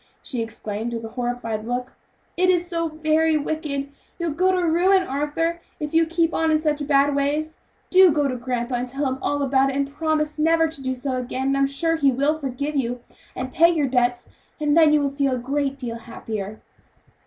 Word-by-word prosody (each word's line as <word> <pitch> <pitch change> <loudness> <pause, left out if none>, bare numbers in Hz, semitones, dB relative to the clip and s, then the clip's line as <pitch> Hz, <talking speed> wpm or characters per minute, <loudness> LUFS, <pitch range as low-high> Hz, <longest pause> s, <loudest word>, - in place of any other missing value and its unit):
she 255 -7 -3
exclaimed 225 0 -4
with 230 0 -5
a - - -6
horrified 240 -3 -3
look. 245 +2 -3 0.4
"It 370 +1 +2
is 355 -1 +3
so 335 -1 -2
very 310 0 +2
wicked! 290 -2 -3 0.3
you'll 340 -2 -2
go 365 +5 +2
to 365 -1 +1
ruin, 370 +4 +4
Arthur, 325 +3 -2 0.2
if 300 +1 -4
you 325 0 +4
keep 335 0 +1
on 325 0 +1
in 310 -1 +3
such 300 -2 -1
bad 285 0 +3
ways; 295 +3 -1 0.3
do 375 -1 +7
go 290 -1 +1
to 255 - -2
grandpa 245 0 -3
and 245 +1 -3
tell 275 +3 -3
him 260 0 -2
all 285 0 0
about 270 0 +3
it, 270 - -3
and 280 0 0
promise 305 +1 -1
never 325 +1 +3
to 315 -3 -9
do 260 -1 -2
so 255 0 -3
again, 260 +2 -2
and 275 - +2
I - - 0
am 275 - +3
sure 325 +4 +1
he 280 -3 +3
will 285 +5 +1
forgive 280 +2 -3
you, 245 -2 -1 0.3
and 255 0 -5
pay 335 +1 +6
your 320 -4 +1
debts, 245 -1 +1 0.3
and 300 -1 +2
then 320 -2 +6
you 300 -1 +4
will 280 -1 0
feel 275 -1 0
a - - 0
great 275 +2 -2
deal 240 -4 -5
happier." 215 -3 -6
285 Hz, 215 wpm, -23 LUFS, 255-315 Hz, 0.4 s, do